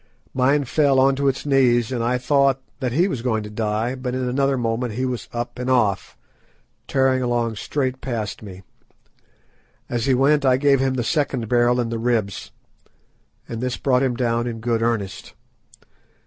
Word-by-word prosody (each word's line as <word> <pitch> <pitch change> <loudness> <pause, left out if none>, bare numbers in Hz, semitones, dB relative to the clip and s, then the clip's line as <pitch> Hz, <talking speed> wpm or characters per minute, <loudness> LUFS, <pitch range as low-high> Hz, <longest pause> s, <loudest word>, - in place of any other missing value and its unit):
Mine 135 +3 +2
fell 140 0 +2
on 135 +1 +4
to 140 +1 0
its 135 +1 -1
knees 125 -4 +3
and 120 -3 -1
I 125 +2 +1
thought 135 +1 +2 0.2
that 130 -3 -2
he 170 +9 +2
was 135 -12 -3
going 110 -3 -1
to 105 - -8
die, 110 +2 -1
but 130 -1 -4
in 130 -1 -2
another 135 +2 +1
moment 115 0 -2
he 130 +2 -1
was 125 -2 -4
up 120 +1 -5
and 125 +1 -3
off, 110 -7 +1 0.7
tearing 130 -1 +2
along 120 -3 -1
straight 130 +1 -2
past 115 -5 -4
me. 95 -3 -10 1.2
As 120 -1 -2
he 130 - +4
went 145 +3 +3
I 130 -2 +4
gave 140 0 +3
him 135 0 0
the 125 - -1
second 135 -3 -1
barrel 120 +1 +3
in 120 -1 -1
the 115 0 -3
ribs, 115 -5 -1 1.0
and 115 0 -5
this 125 -1 -2
brought 130 -2 +2
him 130 -3 0
down 120 -1 0
in 115 -1 -5
good 115 0 -1
earnest. 115 -5 -2
125 Hz, 180 wpm, -22 LUFS, 115-135 Hz, 1.2 s, on